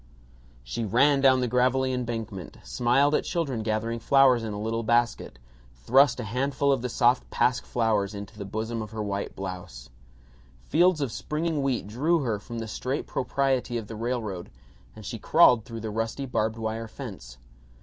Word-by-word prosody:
She 65 - -4
ran 135 +7 +3
down 130 -1 +5
the 125 - +1
gravelly 130 +2 +2
embankment, 115 -6 -5
smiled 135 +4 +2
at - - +2
children 145 -10 -2
gathering 110 +1 -2
flowers 130 0 +4
in 110 - -4
a 105 - -5
little 110 +2 -2
basket, 120 - 0 0.4
thrust 130 - +4
a - - -3
handful 135 +5 0
of 135 -3 +1
the 125 - -3
soft 120 +2 +2
pasque 125 0 +1
flowers 110 -4 0
into 100 +2 -8
the 105 - -6
bosom 110 +3 -3
of 105 - -6
her 110 -1 -4
white 100 -1 -3
blouse. 90 -11 -7 0.7
Fields 175 - +3
of 135 -5 -1
springing 155 +4 -2
wheat 135 -6 -1
drew 150 +11 +1
her 115 -6 -1
from 115 +3 -8
the 115 -1 -4
straight 130 +6 -3
propriety 130 -2 -1
of 115 - -5
the 110 - -8
railroad 110 -6 -3 0.5
and 110 -1 -11
she 115 +1 -5
crawled 125 -5 +5
through 115 -1 -7
the 110 0 -4
rusty 115 +5 -2
barbed 110 -3 -1
wire 110 0 -3
fence. 100 - -9
115 Hz, 175 wpm, -26 LUFS, 110-130 Hz, 0.7 s, down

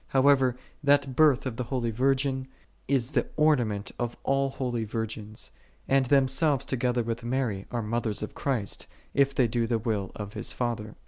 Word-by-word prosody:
How 135 +1 +3
ever, 130 -3 +4 0.3
That 140 -2 +3
Birth 150 -4 +5
of 120 -3 -3
the 125 - -2
Holy 120 -2 -1
Virgin 130 +2 +1 0.4
is 130 -2 +1
the 130 -4 +1
ornament 120 -10 +2
of 120 -1 -2
all 135 0 +2
holy 125 -3 -2
virgins; 110 -1 -4 0.4
and 135 -1 +3
themselves 135 +1 +3
together 125 -2 0
with 115 0 -3
Mary 120 -5 -1
are 120 -2 -2
mothers 110 -1 -1
of 105 - -5
Christ, 120 -8 -2 0.3
if 140 0 +3
they 125 - +4
do 115 0 0
the 115 0 +1
will 105 -4 -2
of 105 0 -6
His - - -3
Father. 115 -4 -3
125 Hz, 175 wpm, -28 LUFS, 115-135 Hz, 0.4 s, Birth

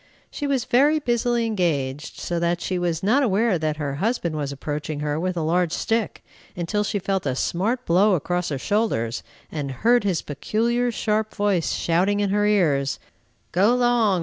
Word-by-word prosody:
She 290 - -3
was 270 -4 0
very 285 +5 +4
busily 240 -3 0
engaged, 150 -9 -2
so 175 -1 -2
that 170 +1 0
she 180 +1 -2
was 170 -1 -1
not 235 +8 +3
aware 215 -5 +2
that 155 -1 -1
her 140 -2 -3
husband 200 -7 0
was 145 -2 -3
approaching 150 +2 -4
her 150 +1 -1
with 185 +1 -2
a 165 - 0
large 170 +1 +1
stick, 225 +4 -1 0.3
until 180 +5 -1
she 205 0 -1
felt 190 -4 -1
a 130 - 0
smart 220 - -1
blow 190 +4 +4
across 175 +2 -1
her 140 - -2
shoulders, 130 - -1 0.3
and 145 -3 -3
heard 230 - +2
his 190 -5 0
peculiar, 235 - 0
sharp 215 -1 -1
voice 205 -5 +1
shouting 185 +5 +1
in 200 -1 0
her 205 +1 +2
ears, 150 -10 +2 0.5
"Go 205 +7 +3
'long! 240 -6 +3
185 Hz, 175 wpm, -23 LUFS, 155-225 Hz, 0.5 s, very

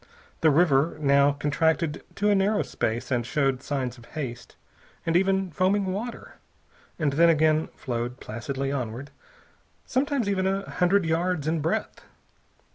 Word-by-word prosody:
The 160 - +4
river 155 -1 +3
now 140 -1 +4
contracted 155 +2 0
to 205 +1 +2
a - - +5
narrow 200 +2 +2
space 120 +4 -3
and 120 -2 +1
showed 135 0 0
signs 130 -3 -3
of 115 - -15
haste, 125 -4 -6 0.5
and 165 - 0
even 190 0 +2
foaming 190 +5 +1
water, 230 +5 -6 0.6
and 150 -4 0
then 170 +4 +5
again 155 0 +3
flowed 120 0 -4
placidly 135 +5 -4
onward, 130 +1 -4 0.7
sometimes 265 -3 0
even 190 -2 +1
a 195 +1 -1
hundred 180 +1 +2
yards 165 -1 0
in 160 0 0
breadth. 160 - -2
155 Hz, 140 wpm, -26 LUFS, 135-185 Hz, 0.7 s, a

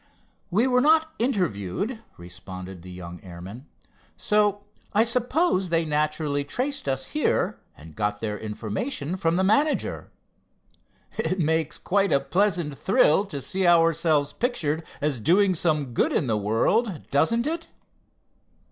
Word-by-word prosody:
"We 210 +7 +2
were 250 -1 +3
not 315 +2 +4
interviewed," 200 - -1 0.2
responded 90 +1 -9
the 90 - -11
young 90 -1 -9
airman, 95 - -10 0.5
"so 205 -1 +1 0.3
I 215 - +6
suppose 245 - +1
they 165 0 +1
naturally 150 -1 0
traced 260 - -3
us 135 0 -2
here, 305 - 0 0.2
and 75 0 -13
got 105 +3 -1
their 105 -2 -3
information 110 - -4
from 165 -2 0
the 190 - +2
manager. 285 +10 +1 1.1
It 185 - 0
makes 160 -1 0
quite 200 +1 +1
a 140 - +4
pleasant 165 0 0
thrill, 195 -3 +3
to 145 -9 -6
see 190 -1 -1
ourselves 165 -3 +3
pictured 165 - -1 0.2
as 145 -4 0
doing 185 - +3
some 155 -6 0
good - - +2
in - - +1
the 115 -3 0
world; 145 - +1
doesn't 230 - +2
it?" 330 +2 -3
165 Hz, 135 wpm, -25 LUFS, 125-210 Hz, 1.1 s, I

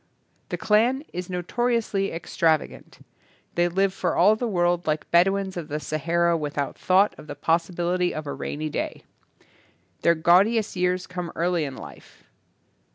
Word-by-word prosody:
The - - -3
clan 235 +6 +2
is 180 0 -5
notoriously 200 +2 -1
extravagant. 165 -1 -2 0.5
They 175 0 +2
live 190 +2 +1
for - - -1
all 205 +5 +5
the 240 +2 -2
world 175 -4 0
like 155 0 -2
Bed 170 +2 +6
ouins 195 -1 -2
of 165 -3 -5
the 150 0 -3
Sahara 170 +3 0
without 145 -3 -3
thought 190 +3 +3
of - - -12
the 145 - -6
possibility 175 +3 0
of 155 - -5
a 140 - -4
rainy 155 +1 -4
day. - - -4 1.0
Their 170 - +4
gaudiest 195 +7 +3
years 180 0 0
come 180 -2 -6
early 170 -1 0
in 135 -2 -6
life. 60 - -13
175 Hz, 155 wpm, -24 LUFS, 165-195 Hz, 1.0 s, Bed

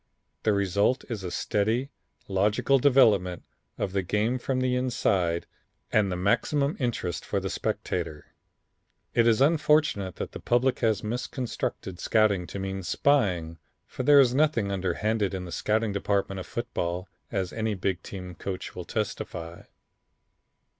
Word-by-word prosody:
The 110 - +2
result 100 +5 +1
is 110 -5 -4
a 90 - -3
steady, 110 +9 0 0.4
logical 105 +7 +2
development 105 -10 +4 0.3
of 95 - -2
the 100 - +1
game 105 +7 0
from 130 +1 -1
the 130 0 +1
inside 100 -9 +1 0.5
and 105 -3 +3
the - - -1
maximum 140 - +1
interest 120 - -2
for - - -1
the - - -4
spectator. 75 -1 -3 0.8
It 115 0 +4
is 115 +2 +4
unfortunate 150 - +3
that - - -5
the - - -8
public 125 +2 +1
has 110 -4 +1
misconstrued 115 -5 -4
scouting 105 -5 +2
to - - -6
mean 95 0 -3
spying, 90 - +1 0.3
for - - -6
there 145 +2 +7
is 125 -3 +5
nothing 130 -8 +2
underhanded 100 +2 0
in 90 -1 -4
the 85 - -8
scouting 110 +3 0
department 100 -1 -1
of 95 - -7
football 90 -6 -3 0.2
as 95 -4 -2
any 110 -1 -1
big 95 -1 -1
team 90 -2 -8
coach 95 +2 -5
will - - -7
testify." 85 -1 -4
105 Hz, 145 wpm, -27 LUFS, 95-125 Hz, 0.8 s, there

